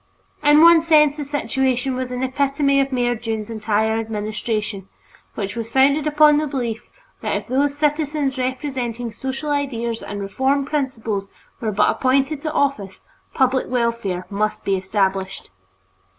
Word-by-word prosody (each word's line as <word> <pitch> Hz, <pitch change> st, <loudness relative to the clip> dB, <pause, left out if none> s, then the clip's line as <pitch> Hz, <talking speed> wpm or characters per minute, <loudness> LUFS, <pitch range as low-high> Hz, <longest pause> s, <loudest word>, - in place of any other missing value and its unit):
In 295 Hz, 0 st, +6 dB
one 335 Hz, -1 st, +8 dB
sense 305 Hz, -3 st, +4 dB
the 300 Hz, -, -4 dB
situation 265 Hz, -2 st, -1 dB
was 255 Hz, 0 st, -4 dB
an 250 Hz, +1 st, -3 dB
epitome 275 Hz, +1 st, +1 dB
of 275 Hz, 0 st, -2 dB
Mayor 245 Hz, -1 st, +1 dB
Dunne's 220 Hz, -1 st, -4 dB
entire 220 Hz, 0 st, 0 dB
administration, 215 Hz, -2 st, -3 dB, 0.5 s
which 200 Hz, 0 st, -4 dB
was 230 Hz, -1 st, -5 dB
founded 280 Hz, +4 st, +3 dB
upon 300 Hz, 0 st, +5 dB
the 305 Hz, 0 st, 0 dB
belief 240 Hz, -5 st, -3 dB, 0.4 s
that -, -, -1 dB
if -, -, -3 dB
those 280 Hz, +3 st, 0 dB
citizens 295 Hz, -2 st, 0 dB
representing 255 Hz, -3 st, -3 dB
social 265 Hz, +6 st, -4 dB
ideals 235 Hz, -5 st, -2 dB
and 205 Hz, -, -6 dB
reform 265 Hz, +8 st, 0 dB
principles 230 Hz, -9 st, -2 dB, 0.3 s
were 220 Hz, -2 st, -2 dB
but 210 Hz, +1 st, +3 dB
appointed 275 Hz, +3 st, +1 dB
to 310 Hz, -, -3 dB
office, 275 Hz, -11 st, -1 dB, 0.3 s
public 260 Hz, -1 st, +2 dB
welfare 230 Hz, -7 st, -1 dB
must 210 Hz, +1 st, -1 dB
be 195 Hz, -, +1 dB
established. 190 Hz, -, -2 dB
255 Hz, 145 wpm, -21 LUFS, 220-280 Hz, 0.5 s, one